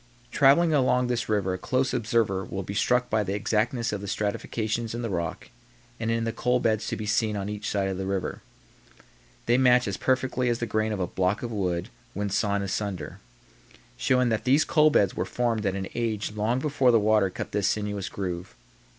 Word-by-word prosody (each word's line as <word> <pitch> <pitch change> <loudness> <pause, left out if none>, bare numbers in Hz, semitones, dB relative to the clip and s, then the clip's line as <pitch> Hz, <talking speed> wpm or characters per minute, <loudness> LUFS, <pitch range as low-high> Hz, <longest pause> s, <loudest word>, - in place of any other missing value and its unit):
Traveling 155 +4 +5
along 125 -3 +3
this 120 -2 -2
river 100 -3 +1
a 90 - -4
close 130 +5 0
observer 110 -5 +1
will 95 +1 -5
be 100 - -6
struck 125 +4 +2
by 110 0 +1
the 100 0 -2
exactness 115 +3 0
of 100 - -3
the 100 - -6
stratifications 110 +3 -2
in 120 - -4
the 115 - -3
rock 85 -3 -4 0.5
and 115 - -2
in 115 0 0
the 115 - -1
coal 125 +2 +1
beds 110 -2 0
to - - -2
be 110 - -5
seen 110 0 +1
on 100 0 -3
each 105 0 -4
side 100 -1 0
of 95 -1 -3
the 95 - -3
river. 95 -1 -3 1.0
They 120 +2 +3
match 125 -2 +4
as 100 - -2
perfectly 130 -1 0
as 120 - +1
the 115 - -2
grain 110 0 0
of 105 - -3
a 90 - +1
block 95 +4 -1
of 120 - -4
wood 90 -5 -2 0.3
when 100 0 -2
sawn 100 0 0
asunder 100 -2 -4 0.8
showing 125 -1 +2
that 110 -1 -1
these 135 +5 +4
coal 155 -1 +4
beds 100 -10 +2
were - - -1
formed 115 -4 -1
at 95 - -1
an 95 -1 -3
age 110 -4 -2
long 105 +3 0
before 135 -2 +2
the 115 -2 +5
water 105 -2 +3
cut - - -6
this 100 -2 +1
sinuous 105 -2 -2
groove. 90 -6 -5
110 Hz, 210 wpm, -26 LUFS, 100-120 Hz, 1.0 s, Traveling